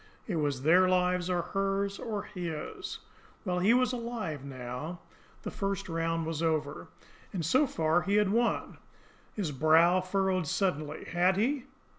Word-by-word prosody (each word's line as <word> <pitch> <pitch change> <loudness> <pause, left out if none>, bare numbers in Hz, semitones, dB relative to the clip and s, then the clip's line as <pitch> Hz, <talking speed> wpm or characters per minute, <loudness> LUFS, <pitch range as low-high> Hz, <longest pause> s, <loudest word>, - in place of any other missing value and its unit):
It 185 -7 -2
was 145 -4 -1
their 180 +4 +5
lives, 180 -1 +2
or 175 -2 +1
hers, 195 +1 -1
or 210 -3 -3
his! 170 -5 -5 0.5
Well, 180 -2 0
he 195 +5 +4
was 255 0 +2
alive 230 - -4
now, 135 +5 -6 0.4
the - - -4
first 195 0 -3
round 165 -1 -1
was 160 -1 -3
over, 155 -3 -1 0.4
and 175 -5 -3
so 260 - +3
far 160 -4 +1
he 195 +3 0
had 210 -2 +4
won. 235 +2 0 0.6
His 190 -8 -2
brows 165 +6 +4
furrowed 190 -3 +1
suddenly. 155 -4 -1
Had 180 +2 +2
he? 255 +5 0
180 Hz, 150 wpm, -30 LUFS, 160-195 Hz, 0.6 s, their